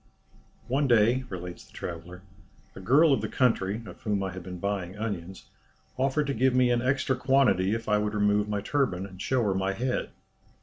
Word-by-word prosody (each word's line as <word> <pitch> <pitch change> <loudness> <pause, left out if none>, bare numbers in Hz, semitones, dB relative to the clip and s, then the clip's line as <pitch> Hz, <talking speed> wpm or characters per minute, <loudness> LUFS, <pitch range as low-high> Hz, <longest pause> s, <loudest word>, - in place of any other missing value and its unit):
"One 135 +3 +1
day," 120 +2 +3
relates 90 -2 -7
the - - -22
traveller, 90 +2 -7 0.5
"a - - -8
girl 140 - +5
of 125 - +1
the 110 - -2
country, 110 -3 +1
of - - -11
whom 105 -3 -1
I 95 - -3
had 95 +1 -7
been 90 +1 -7
buying 100 0 -3
onions, 95 -4 -5 0.5
offered 135 +3 +1
to 140 - -1
give 130 +2 +2
me 125 -1 +4
an 120 -1 +2
extra 130 +1 +1
quantity 125 -7 +2
if 115 0 -6
I 105 -1 +3
would 105 0 -2
remove 105 0 +2
my 105 -1 -1
turban, 105 -7 0
and 95 -1 -11
show 130 -2 +1
her 100 -3 +1
my 95 +1 -1
head. 125 +5 -2
105 Hz, 200 wpm, -27 LUFS, 95-130 Hz, 0.5 s, girl